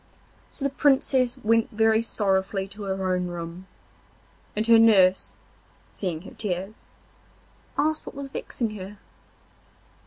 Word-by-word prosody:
So 280 - -5
the 275 - +1
Princess 265 -3 +2
went 230 +1 +3
very 220 +1 +3
sorrowfully 195 -3 0
to 205 +2 -11
her 190 -1 -1
own 180 0 -1
room, 175 +1 -7 0.9
and 215 +1 0
her 230 0 +7
nurse, 190 -5 +4 0.6
seeing 175 -4 -4
her - - -11
tears, 195 +1 -5 0.9
asked 310 +2 0
what - - -8
was 280 0 -6
vexing 235 -4 -3
her. 195 +2 -9
210 Hz, 125 wpm, -25 LUFS, 190-230 Hz, 0.9 s, her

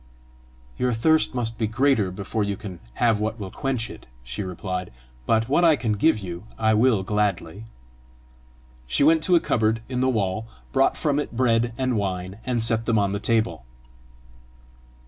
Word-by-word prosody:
"Your 125 -1 +1
thirst 155 +5 +2
must 115 -2 -3
be 110 - +1
greater 120 -3 +2
before 100 +3 -3
you 100 -1 -2
can 95 -5 -8 0.2
have 115 -3 +2
what 110 +1 -2
will 95 -2 -6
quench 130 -4 -2
it," - - -12 0.2
she 60 +9 -5
replied; 90 -1 -4 0.4
"but 115 0 +2
what 145 +6 +2
I 165 -2 +6
can 115 -6 -2
give 110 +9 +3
you, 90 -1 -7
I 110 -1 +2
will 110 -2 +3
gladly." 100 -1 -1 1.2
She 65 - +1
went 160 +2 +5
to 180 - +4
a - - +6
cupboard 110 -5 0
in 125 -1 -2
the 130 - +3
wall, 110 -2 -1 0.3
brought 135 -1 +3
from 145 -1 +1
it 140 -5 -5
bread 120 -2 +2
and 130 -3 0
wine, 95 0 -3
and 120 -3 0
set 115 0 0
them 115 -2 +3
on 100 -1 +2
the 100 - -2
table. 110 - 0
110 Hz, 175 wpm, -24 LUFS, 100-125 Hz, 1.2 s, I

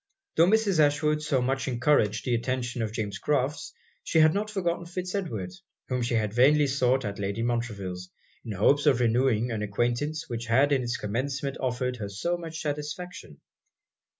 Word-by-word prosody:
Tho' 165 - +5
Mrs. 205 -4 +3
Ashwood 150 +1 +3
so 140 -4 0
much 135 +1 -1
encouraged 120 -4 +2
the 125 - 0
attention 120 0 -2
of 110 -2 -2
James 105 -3 -4
Crofts, 145 0 -1 0.3
she - - 0
had 155 0 +6
not 210 +2 -1
forgotten 175 -4 -2
Fitz 180 +1 -5
Edward, 115 - -3 0.4
whom 125 -1 -1
she 120 0 0
had 105 -2 0
vainly 145 +5 +5
sought 130 -2 +1
at 100 0 -4
Lady 100 +3 -2
Montreville's, 100 -7 -3 0.3
in 110 - -5
hopes 145 - +3
of 135 -4 +4
renewing 120 0 +2
an 110 -2 -2
acquaintance 120 +9 -1
which 115 -2 -5
had 135 +5 +3
in 135 -2 +3
it's 120 0 -2
commencement 135 +6 -3
offered 125 -1 -1
her 105 -3 -5
so 170 - -1
much 165 -2 -6
satisfaction. 150 +6 -5
130 Hz, 175 wpm, -27 LUFS, 115-150 Hz, 0.4 s, had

